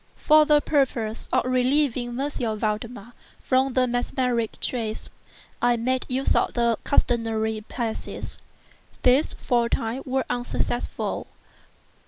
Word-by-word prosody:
For 305 0 +5
the 300 -1 +5
purpose 245 -8 0
of - - +2
relieving 255 -1 +1
M. 250 -6 -2
Valdemar 220 +2 -3 0.3
from 260 0 +1
the 255 0 +3
mesmeric 245 -1 -1
trance, 225 -3 -3 0.5
I 240 0 +3
made 255 +2 0
use 265 +2 +1
of - - +1
the 235 -2 +2
customary 225 -4 +1
passes. 230 -3 -4 0.6
These, 255 +4 +4
for 240 -1 +1
a - - -8
time, 230 +4 -1
were 265 0 0
unsuccessful. 245 0 -2
245 Hz, 120 wpm, -25 LUFS, 230-260 Hz, 0.6 s, For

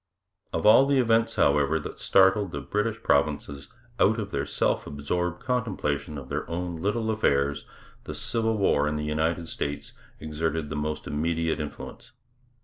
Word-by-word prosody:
Of - - -2
all 115 +6 +7
the 140 -1 +3
events, 115 -2 +2
however, 75 +2 +3
that 80 - -7
startled 95 +1 +4
the 70 - -5
British 105 +7 -2
provinces 70 -1 0 0.3
out 110 +3 +4
of 100 -2 -5
the 70 +1 -2
self - - 0
absorbed 90 +5 -3
contemplation 95 - -2
of 65 -2 -8
their - - -4
own 85 0 -3
little 110 +6 -1
affairs, 70 -9 +1 0.4
the - - -6
Civil 115 -1 0
War 75 -7 +2
in 75 - -1
the 75 0 -3
United 80 +2 -1
States 70 -2 -4 0.3
exerted 80 0 -3
the - - -3
most 75 +1 -3
immediate 80 +1 -1
influence. 75 -1 -8
80 Hz, 155 wpm, -26 LUFS, 75-105 Hz, 0.4 s, all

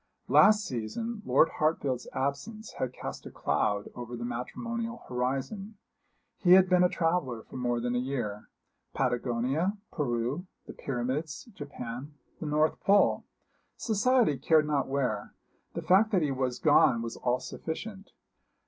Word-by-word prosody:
Last 210 -1 +6
season 210 - -4
Lord 160 - +5
Hartfield's 145 -5 0
absence 170 +12 -3
had 130 - -1
cast - - -7
a - - -7
cloud 105 -1 -1
over 120 0 -7
the 120 - -4
matrimonial 230 - -4
horizon. 135 - -3 0.6
He 180 -3 +6
had 190 0 +7
been 180 -1 +4
a 180 - +4
traveller 165 -11 -1
for - - -14
more 120 -1 0
than 120 +1 -1
a 125 - +1
year 120 -6 -4 0.5
Patagonia, 130 - 0
Peru, 130 +4 -2 0.2
the - - -9
Pyramids, 135 - -3
Japan, 140 -2 -7 0.2
the 160 - -4
North 155 +1 +2
Pole 200 +1 +3 0.5
society 220 - +2
cared 155 +2 +4
not 145 -3 0
where 125 -7 -2 0.4
the - - -3
fact 200 +4 +5
that 180 -4 +3
he 145 - 0
was 130 -2 -1
gone 115 -1 +4
was 115 - -5
all 125 0 0
sufficient. 195 +8 -6
140 Hz, 140 wpm, -29 LUFS, 125-185 Hz, 0.6 s, had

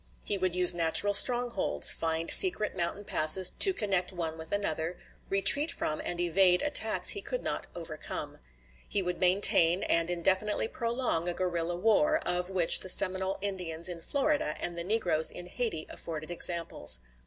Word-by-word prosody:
He 205 - -2
would 185 -2 -4
use 180 -1 +7
natural 175 +4 +2
strongholds; 240 -1 +4
find 165 0 -3
secret 345 - +5
mountain 185 +3 -5
passes 165 +3 +2
to 390 - +5
connect 195 - -3
one 165 -3 -7
with 160 0 -12
another; 170 -4 -5 0.3
retreat 285 +11 +5
from 155 - -6
and 175 - -7
evade 180 +1 +2
attacks 255 -7 +1
he 405 - +2
could - - -7
not - - -6
overcome. 165 -3 -9 0.5
He 200 - -2
would 180 0 -6
maintain 180 -1 +2
and 165 0 -2
indefinitely 190 +5 -2
prolong 230 -8 -5
a 175 - -6
guerrilla 175 -2 -5
war, 225 - -1
of 180 +1 -3
which 180 -3 +5
the 185 - -4
Seminole 190 +1 -1
Indians 180 -5 -3
in 175 -2 -7
Florida 280 - -4
and 175 - -6
the 170 - -7
negroes 180 -6 -1
in 175 - -8
Hayti 180 -4 -7
afforded 155 0 -9
examples. 170 - +2
180 Hz, 160 wpm, -26 LUFS, 170-205 Hz, 0.5 s, use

